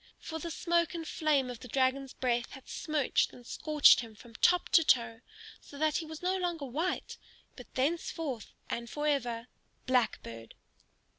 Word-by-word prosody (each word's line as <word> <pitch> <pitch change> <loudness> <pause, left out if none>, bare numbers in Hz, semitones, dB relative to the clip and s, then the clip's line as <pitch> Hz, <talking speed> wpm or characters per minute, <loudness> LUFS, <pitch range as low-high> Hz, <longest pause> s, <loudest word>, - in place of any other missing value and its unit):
For 320 0 -6
the 335 - -5
smoke 340 +1 +1
and 325 -1 -5
flame 285 -6 +1
of 240 - -8
the - - -10
dragon's 265 +2 0
breath 240 -2 -1
had 265 - -12
smirched 305 -4 0
and 245 - -14
scorched 305 +3 +5
him 225 -2 -7
from 230 +2 -15
top 355 +9 +3
to 330 - +6
toe, 235 -5 +2 0.4
so 285 - -13
that 310 0 +2
he 325 - -4
was 315 +2 -9
no 370 +1 +1
longer 345 -5 -2
white, 310 +8 -3 0.4
but 250 - -12
thenceforth 285 -3 -2 0.2
and 235 0 -4
forever 270 -6 -1 0.4
Blackbird. 215 - -1
275 Hz, 160 wpm, -31 LUFS, 240-320 Hz, 0.4 s, to